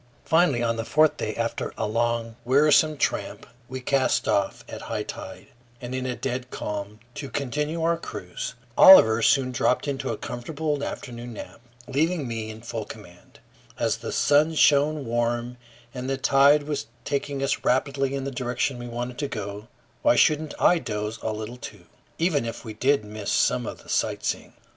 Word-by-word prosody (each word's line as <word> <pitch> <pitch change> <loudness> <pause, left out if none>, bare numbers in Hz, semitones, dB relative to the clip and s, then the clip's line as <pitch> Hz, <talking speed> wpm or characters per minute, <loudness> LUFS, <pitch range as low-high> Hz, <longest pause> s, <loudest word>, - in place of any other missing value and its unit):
Finally, 160 -7 +3
on 115 -1 0
the 115 - -2
fourth 155 +6 +3
day, 110 - -3
after 115 0 -2
a - - -1
long, 115 +1 -1
wearisome 150 +4 +4
tramp, - - -2 0.2
we 130 +1 -5
cast 130 +1 +1
off 100 -1 0
at - - -8
high - - -3
tide, - - -8 0.3
and 125 0 -7
in 130 0 -2
a 125 - -2
dead 125 -1 -4
calm, 105 -1 -5
to 145 0 -6
continue 150 +4 -2
our 165 0 +2
cruise. 90 - -6 0.2
Oliver 115 -12 +9
soon 130 +1 +3
dropped 125 +2 +1
into 140 -2 -2
a - - -2
comfortable 145 +4 -3
afternoon 120 -3 -6
nap, 110 - -10 0.3
leaving 155 +1 0
me 115 -2 -4
in 110 0 -9
full 115 -2 -4
command. 90 -5 -13 0.4
As - - 0
the - - -6
sun 150 +3 +3
shone 150 0 +4
warm 120 +1 -1 0.4
and 130 0 -5
the 135 - 0
tide 140 +2 +5
was 145 -5 -3 0.2
taking 140 -1 -2
us 135 - -1
rapidly 135 +1 +1
in 135 - -3
the 140 - -3
direction 125 0 -2
we 120 - -6
wanted 120 +1 -5
to 145 - -1
go, 105 -2 -6 0.3
why - - +4
shouldn't 155 +3 +2
I 175 - +5
doze 105 -3 -4
a 110 - -2
little 110 +3 -6
too, 105 -7 -10 0.3
even 160 -5 +1
if 115 +1 -6
we 110 - -6
did 130 +1 +1
miss 105 -1 -5
some - - +2
of - - -7
the - - -16
sightseeing? - - -1
125 Hz, 175 wpm, -25 LUFS, 115-145 Hz, 0.4 s, Oliver